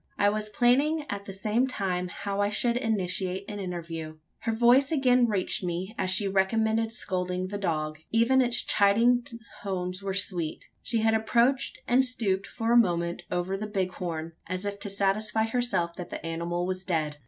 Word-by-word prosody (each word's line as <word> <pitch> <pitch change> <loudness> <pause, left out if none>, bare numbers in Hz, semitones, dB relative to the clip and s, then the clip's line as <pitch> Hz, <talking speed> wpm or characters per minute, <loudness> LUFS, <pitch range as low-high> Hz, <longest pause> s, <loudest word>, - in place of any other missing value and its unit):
I 205 - +4
was 215 0 -2
planning, 275 +8 +2
at 200 0 -5
the - - -5
same 215 +6 +1
time, 185 -7 -2
how 200 +3 -3
I 205 - +2
should 235 +3 0
initiate 190 -5 -1
an 205 -1 -6
interview. 165 -4 -5 0.2
Her 225 - -1
voice 245 +5 +4
again 255 -5 +4
reached 195 -3 -1
me, 180 +3 -3
as 190 -4 -1
she 190 +2 +2
recommenced 220 +3 +1
scolding 180 -3 -2
the 205 0 -4
dog: 155 -4 -2
even 235 +4 +4
its 240 -1 +1
chiding 230 +5 +4 0.4
tones 185 -1 -3
were 195 -1 -3
sweet. 175 -5 0 0.2
She 230 -2 0
had 220 0 +3
approached, 235 +4 +1
and 255 +2 +4
stooped 205 -7 -1
for 225 0 -2
a 240 - +6
moment 170 -5 +2
over 180 +2 -1
the 210 +2 -4
bighorn, 180 -5 -3 0.2
as 185 +2 -4
if 200 0 -3
to 200 - -4
satisfy 205 +3 +1
herself 225 -7 0
that 180 - -6
the - - -6
animal 170 +2 -2
was 185 0 -3
dead. 155 -5 -1
200 Hz, 175 wpm, -28 LUFS, 180-225 Hz, 0.4 s, a